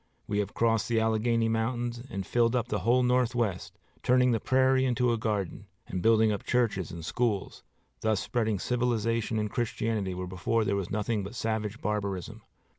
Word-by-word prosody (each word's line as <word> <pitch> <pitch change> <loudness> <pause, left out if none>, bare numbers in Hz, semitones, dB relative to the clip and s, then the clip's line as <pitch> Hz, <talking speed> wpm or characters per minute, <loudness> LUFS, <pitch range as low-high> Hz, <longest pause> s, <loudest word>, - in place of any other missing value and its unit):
We 105 0 -1
have 100 -1 -3
crossed 115 -2 +2
the 115 -1 +2
Alleghany 115 +1 +1
mountains 120 +1 -1
and 95 -1 -4
filled 120 +3 +2
up 120 - 0
the - - -1
whole 125 +2 +3
Northwest, 120 -6 0 0.2
turning 125 0 +4
the 115 - +1
prairie 130 +2 +3
into 125 -1 +2
a - - 0
garden, 105 -5 -2 0.2
and 90 - -4
building 110 0 +4
up 105 - -3
churches 110 -9 0
and 85 -1 -7
schools, 110 -1 -1 0.4
thus 110 -2 +1
spreading 110 -4 0
civilization 115 -1 0
and 105 -1 -1
Christianity 110 -5 -1
where 90 0 -4
before 95 +5 0
there 100 0 +1
was 100 -3 -2
nothing 105 0 -1
but 100 +5 -7
savage 110 -1 -2
barbarism. 100 -4 -3
115 Hz, 175 wpm, -29 LUFS, 105-120 Hz, 0.4 s, turning